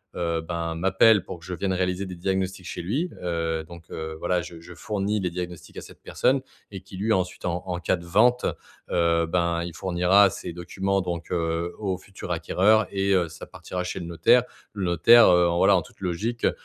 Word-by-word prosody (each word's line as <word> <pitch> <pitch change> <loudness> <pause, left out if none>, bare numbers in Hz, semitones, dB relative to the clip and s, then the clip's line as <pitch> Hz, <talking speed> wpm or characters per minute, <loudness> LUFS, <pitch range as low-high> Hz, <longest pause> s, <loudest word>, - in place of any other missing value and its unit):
heu, 85 -2 -1
ben, 85 0 -4
m'appelle 95 +3 +4
pour 90 - -8
que 85 - -15
je 90 - -5
vienne 95 +2 -2
réaliser 90 +1 -1
des 90 - -7
diagnostics 95 +1 -2
chez 85 - -5
lui, 135 - -1
heu, 80 -2 -1
donc, 85 0 -13
heu, 80 0 -5
voilà, 90 +1 0
je 85 0 -10
je 90 +2 -12
fournis 105 +2 -2
les 90 - -1
diagnostics 90 -1 -7
à - - -5
cette - - -14
personne 135 +1 +1 0.3
et 95 -2 -8
qui 95 0 -12
lui 110 +3 +1
ensuite, 90 -2 -2
en 90 -1 -2
en 90 -1 -3
cas 90 - +1
de 85 -1 -10
vente, 120 +8 +3 0.5
heu, 85 -1 +2
ben, 85 0 0
il 85 -1 -6
fournira 95 +2 +3
ces - - -7
documents, 95 +3 -2
donc, 85 -2 -4
heu, 85 0 -1
au 95 -3 -2
futur 95 -2 -9
acquéreur 95 +5 +2
et 100 0 +1
heu, 90 -3 +2
ça 80 - -10
partira 90 0 -6
chez 95 - -4
le 85 - -6
notaire. 85 +9 +4 0.3
Le 100 - -4
notaire, 90 +7 +6
heu, 90 0 +5
en, 85 - 0
voilà, - - +5
en - - 0
toute - - -17
logique, 100 +7 -3
heu - - +4
90 Hz, 215 wpm, -25 LUFS, 85-95 Hz, 0.5 s, notaire